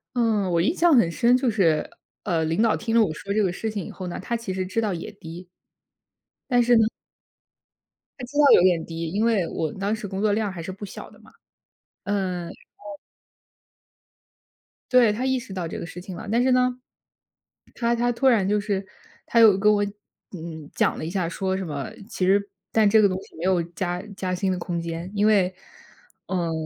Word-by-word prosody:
嗯， 215 -6 +1
我 170 - +2
印 300 - +1
象 340 -2 +4
很 230 -10 +5
深， 240 +7 +3
就 255 -2 +1
是， 165 -8 +1 0.3
呃， 165 -4 0
领 165 +7 0
导 225 -2 +3
听 225 - -3
了 230 - +5
我 170 -7 +1
说 200 +5 -5
这 215 - +2
个 190 - +2
事 220 +3 -3
情 200 -5 -4
以 - - -8
后 185 -1 -7
呢， 175 - -5
他 235 - -3
其 225 -5 -4
实 185 0 -2
知 225 +5 -1
道 210 -4 -1
也 170 - -6
低。 175 -2 -10 1.0
但 245 0 +5
是 240 0 +4
呢 225 - +5 1.4
他 250 - -5
知 290 +4 -8
道 295 - +6
有 - - +7
点 175 -3 +3
低， 165 0 -5
因 210 +3 0
为 210 -7 +2
我 160 -2 -3
当 200 +3 -1
时 215 -2 -6
工 190 +1 -4
作 215 -1 +2
量 210 -2 -1
还 175 -3 -7
是 190 - -6
不 200 +2 -8
小 - - -9
的 - - -19
嘛。 - - -19 0.7
嗯， 190 -3 -2
然 - - -8 0.3
后 205 -1 -10 1.9
对， 240 -4 +5
他 250 +5 -3
意 260 -1 +1
识 200 -5 -10
到 180 -3 -3
这 - - -6
个 - - -5
事 175 +2 -9
情 185 -2 -8
了。 - - -8
但 235 +3 +2
是 260 - +3
呢， 250 0 +2 1.0
他 235 0 0
他 240 +1 +1
突 265 +3 +1
然 215 -7 +4
就 210 0 +2
是 200 -2 -2 0.4
他 230 - +2
又 215 -4 +7
跟 210 +1 +4
我， 205 0 +2 0.5
嗯， 160 -4 -8
讲 - - +1
了 - - -5
一 - - -3
下， 180 -3 -1
说 190 +1 -2
什 190 -1 -3
么 145 -3 -4 0.2
其 185 - -1
实 200 +2 +2 0.2
但 215 -2 +4
这 220 +1 +5
个 200 - +6
东 185 -1 -2
西 - - -17
没 165 - -7
有 180 -3 +2
加 175 +1 -4
加 185 -1 -2
薪 190 +1 0
的 180 - -2
空 170 -1 -3
间。 170 +2 -5
因 205 +1 +2
为， 190 -4 +3 0.7
呃， 175 -3 -1
195 Hz, 235 characters per minute, -24 LUFS, 175-225 Hz, 1.9 s, 有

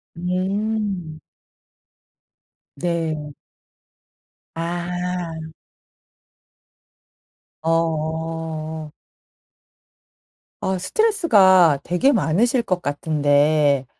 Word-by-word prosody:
음. 185 -1 -2 1.6
네. 160 -2 -2 1.2
아. 170 -1 -4 2.1
어. 160 -1 -2 1.7
아 190 0 -1
스트레스가 190 - +4
되게 180 +11 +2
많으실 235 - +2
것 185 -4 -1
같은데 145 -1 +2
165 Hz, 80 characters per minute, -21 LUFS, 155-185 Hz, 2.1 s, 스트레스가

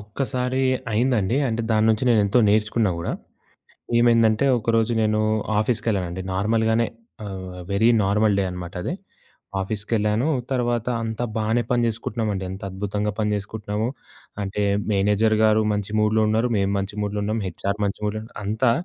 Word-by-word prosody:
ఒక్కసారి 125 +4 -2 0.3
అయిందండి. 115 -1 +1
అంటే 115 0 -1
దాన్నుంచి 110 +2 +3
నేనెంతో 105 0 +3
నేర్చుకున్నా 105 0 +2
గూడా. 85 - -3 0.9
ఏమైందంటే, 115 0 +4
ఒకరోజు 115 +1 +1
నేను 110 0 +2 0.4
ఆఫీస్‌కెళ్ళానండి. 100 -6 -1
నార్మల్‌గానే 110 +3 +2 0.4
ఆహ్, 95 -2 -7
వెరీ 105 +4 +3 0.2
నార్మల్ 105 +1 +2
డే 100 - +2
అనమాట 90 +1 -7
అది. - - -2 0.7
ఆఫీస్‌కెళ్ళాను, 105 +4 0 0.2
తర్వాత 120 -2 0 0.2
అంతా 115 +1 -3
బానే 110 +2 +1
పని 120 -1 +3
చేసుకుంటున్నామండి. 110 -3 -2
ఎంత 95 - -8
అద్భుతంగా 105 +2 -2
పని 105 -1 +1
చేసుకుంటున్నాము. 105 +1 -3 0.5
అంటే, 100 +1 -2 0.3
మేనేజర్ 105 +2 +2
గారు 110 0 +4
మంచి 105 0 -3
మూడ్‌లో 105 +1 +3
ఉన్నారు. 110 +3 +2
మేము 100 0 +1
మంచి 100 +1 -3
మూడ్‌లో 105 0 -2
ఉన్నాం. 110 +2 -1
హెచ్ఆర్ 100 +3 -3
మంచి 100 -1 -2
మూడ్‌లో 105 +1 -1
ఉన్నారు. 115 - -13
అంతా 110 +4 +2
110 Hz, 135 wpm, -23 LUFS, 100-115 Hz, 0.9 s, ఏమైందంటే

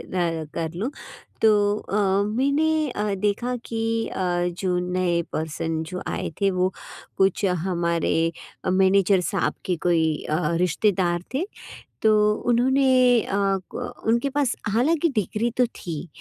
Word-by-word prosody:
अ, 170 -3 -1
कर 160 -1 -3
लूँ 215 +9 -2 0.5
तो 220 - +7 0.3
अ, - - -11 0.4
मैंने 305 +3 +2
अ, 210 -3 -2
देखा 210 +6 -1
कि 225 -1 -3 0.3
अ, - - -6 0.4
जो 180 -2 0
नए 180 -2 +1
पर्सन 160 +1 -2
जो 185 0 -5
आए - - -3
थे 200 -1 +3
वो 185 0 0 0.5
कुछ 195 +1 +2 0.2
हमारे 170 -2 0 0.3
अ, - - +1
मैनेजर 190 0 +4
साहब 180 +1 -1
के 180 - 0
कोई, 160 -2 +1
अ, 155 - +1 0.2
रिश्तेदार 180 0 +1
थे। 315 +8 0 0.6
तो 220 0 +5 0.4
उन्होंने 265 +3 +3 0.5
अ - - 0 0.4
क - - -4 0.3
उनके 235 +5 +2
पास 275 -2 0
हालाँकि 295 +10 +2
डिग्री 215 +3 0
तो 250 - +5
थी, 175 -7 -7
190 Hz, 135 wpm, -24 LUFS, 175-235 Hz, 0.6 s, तो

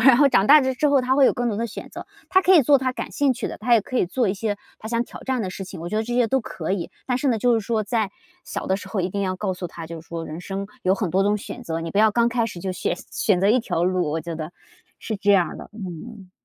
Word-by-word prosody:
然 255 +1 +7
后 285 -1 +6
长 205 -5 +3
大 300 +1 +9
之 260 +2 +1
后 280 - +5
他 255 +1 +1
会 280 - +6
有 - - +5
更 245 -1 -1
多 210 - -2
的 230 - -1
选 - - -8
择， - - -9 0.2
他 375 0 +4
可 375 - +5
以 335 - +8
做 280 +3 +5
他 255 -1 -1
感 - - -5
兴 285 -2 +2
趣 245 -1 -4
的， - - -6
他 230 +3 0
也 225 - +5
可 255 +5 -5
以 - - +3
做 235 +3 0
一 190 - 0
些 205 0 -2 0.2
他 - - -9
想 230 0 +1
挑 - - -11
战 260 -2 -1
的 190 - -3
事 195 +1 -6
情， 185 -2 -9
我 170 - -5
觉 215 - -2
得 220 - +1
这 240 +2 -5
些 245 -1 +3
都 265 +3 +1
可 180 -4 -4
以。 185 -4 -3 0.2
但 250 - +1
是 260 - -2
呢， 230 - +2
就 245 +2 +3
是 225 - +1
说 225 -2 +1
在 215 -1 -1 0.3
小 - - -5
的 190 - +1
时 200 - -9
候 205 - -1
一 180 - 0
定 200 +2 -2
要 185 -1 -1
告 190 -1 -2
诉 180 0 -5
他， 165 -1 -9
就 165 0 -7
是 - - -25
说 165 -1 -5
人 160 +3 -7
生 195 +1 -4 0.2
有 185 +1 +3
很 200 -2 -2
多 190 +3 +2
种 205 +1 +2
选 245 +4 -8
择， 165 -6 -3
你 165 0 -4
不 - - -6
要 215 0 +6
刚 235 +2 +3
开 235 -1 0
始 180 -5 -7
就 190 - -3
选 180 - -1 0.2
选 190 -4 +1
择 195 - +3
一 235 +4 +5
条 225 -8 -1
路， 180 -4 +1
我 160 +2 -1
觉 165 +1 -5
得 160 +1 -6 0.5
是 220 - -4
这 205 0 +3
样 185 -3 +4
儿 - - -8
的。 - - -10
嗯。 195 0 -8
210 Hz, 345 characters per minute, -23 LUFS, 185-245 Hz, 0.5 s, 大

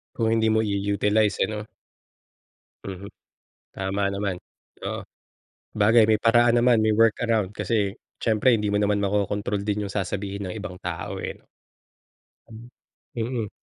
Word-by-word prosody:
Kung 115 -2 0
hindi 110 -1 +2
mo 110 0 +3
i-u-utilize 105 +1 +1
ano? 105 0 -5 1.2
Mhm, 100 +1 -7 0.7
tama 95 +1 -2
naman. 100 -1 -2 0.5
Oo, - - -4 0.7
bagay 110 +1 +5
may 110 -1 +2
paraan 120 +1 +5
naman 120 -1 +4
may 110 0 +2
work 115 0 +4
around 110 -5 +1
kasi 105 0 -1 0.2
siyempre 115 +2 +3
hindi 105 -2 0
mo 105 - +1
naman 105 0 +1
makokontrol 100 0 -1
din 105 0 -1
'yung 100 - -7
sasabihin 100 0 -3
ng - - -5
ibang 100 -4 -7
tao, 85 -3 -5
eh. - - -4 1.1
Hmm. 115 +2 -12 0.5
Mm. 115 -2 -2
105 Hz, 135 wpm, -25 LUFS, 100-110 Hz, 1.2 s, bagay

